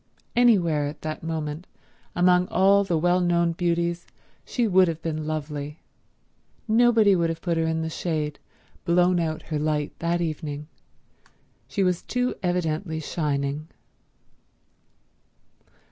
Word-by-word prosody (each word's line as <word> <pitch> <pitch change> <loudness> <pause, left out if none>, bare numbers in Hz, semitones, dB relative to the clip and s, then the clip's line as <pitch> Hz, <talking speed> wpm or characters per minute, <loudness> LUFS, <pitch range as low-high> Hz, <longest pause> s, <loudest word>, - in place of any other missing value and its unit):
Anywhere 175 -12 +3
at 145 0 -8
that 155 0 -4
moment, 160 0 -4 0.5
among 180 0 +4
all 200 +2 +4
the 175 -4 0
well 175 +3 +2
known 170 -1 +2
beauties, 170 0 -1 0.4
she 240 -3 0
would 185 -2 +5
have 165 -1 -3
been 155 -2 -3
lovely. 150 -1 -4 0.9
Nobody 225 -2 +5
could 170 -2 +2
have 165 0 -3
put 170 0 -1
her 165 0 +1
in 160 0 -1
the 160 - -2
shade, 155 -3 -2 0.4
blown 175 0 +3
out 160 -2 -2
her 155 -2 -3
light 150 -1 -1
that 170 +1 0
evening; 150 -3 -4 1.0
she 200 - -1
was 180 -2 +1
too 250 0 -1
evidently 165 -2 -1
shining. 145 -1 -2
165 Hz, 130 wpm, -25 LUFS, 155-180 Hz, 1.0 s, would